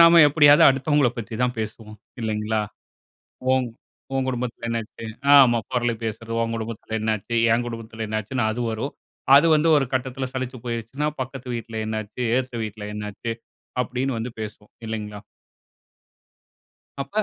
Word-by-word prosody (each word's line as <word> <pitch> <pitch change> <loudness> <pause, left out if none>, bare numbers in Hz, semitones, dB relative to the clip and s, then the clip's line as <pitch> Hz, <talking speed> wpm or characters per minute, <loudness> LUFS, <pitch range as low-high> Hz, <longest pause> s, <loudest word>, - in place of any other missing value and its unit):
நாம 170 0 +9
எப்பிடியாவது 145 0 +7
அடுத்தவங்கள 135 0 +3
பத்தி 115 0 -5
தான் 125 0 -1
பேசுவோம். 110 0 -6 0.3
இல்லேங்களா! 110 0 0 0.9
உன் 130 -2 +2 0.5
உன் 135 - +1
குடும்பத்தில 125 -2 -3
என்ன 115 0 0
ஆச்சு? 110 +1 -11 0.3
ஆமா, 125 -4 +7
புரளி 120 -2 +1
பேசுறது. 115 +1 -4
உன் 115 0 -2
குடும்பத்தில 110 0 -4
என்ன 110 - +1
ஆச்சு? 115 +4 -5 0.2
என் 120 +1 +1
குடும்பத்தில 115 -1 -6
என்ன 110 0 -1
ஆச்சுன்னு 120 +2 -2
அது 120 +2 -2
வரும். 110 +6 -3 0.4
அது 145 +4 +7
வந்து 155 +2 +3
ஒரு 140 - +2
கட்டத்தில 130 0 -1
சலிச்சு 130 -1 -4
போயிருச்சுன்னா, 120 +5 -2
பக்கத்து 130 -1 -6
வீட்ல 115 -1 -6
என்ன 110 0 -2
ஆச்சு? 105 +4 -8 0.2
எதுத்த 130 -1 -3
வீட்ல 105 -1 -6
என்ன 105 0 -4
ஆச்சு? 115 +3 -4 0.5
அப்பிடின்னு 125 0 -2
வந்து 115 +2 -4
பேசுவோம். 105 -1 -8 0.2
இல்லேங்களா! 105 -2 -5 1.8
அப்ப 215 +1 -1
115 Hz, 155 wpm, -24 LUFS, 110-130 Hz, 1.8 s, நாம